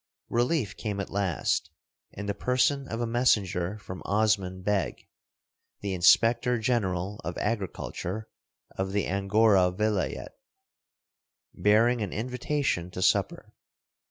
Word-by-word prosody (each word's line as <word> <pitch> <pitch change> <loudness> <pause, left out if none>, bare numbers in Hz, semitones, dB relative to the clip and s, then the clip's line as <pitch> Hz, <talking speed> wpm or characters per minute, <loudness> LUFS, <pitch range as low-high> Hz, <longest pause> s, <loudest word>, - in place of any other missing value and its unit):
Relief 120 - +1
came 105 -3 -4
at 100 - -4
last, 95 -4 0 0.4
in 100 - -6
the 100 - -1
person 130 +5 +1
of 115 - -4
a - - +1
messenger 105 -6 +1
from 95 -3 -9
Osman 100 -3 +1
Beg, 100 -2 -1 0.7
the 100 -1 -2
inspector 115 +7 +4
general 105 -5 -1
of 85 +2 -4
agriculture 105 -1 -3 0.5
of 95 0 -3
the 100 -2 +1
Angora 100 0 +3
vilayet, 105 +1 -1 1.2
bearing 115 +3 +3
an 100 - -3
invitation 125 - -2
to 90 - -7
supper. - - +1
105 Hz, 115 wpm, -28 LUFS, 95-115 Hz, 1.2 s, inspector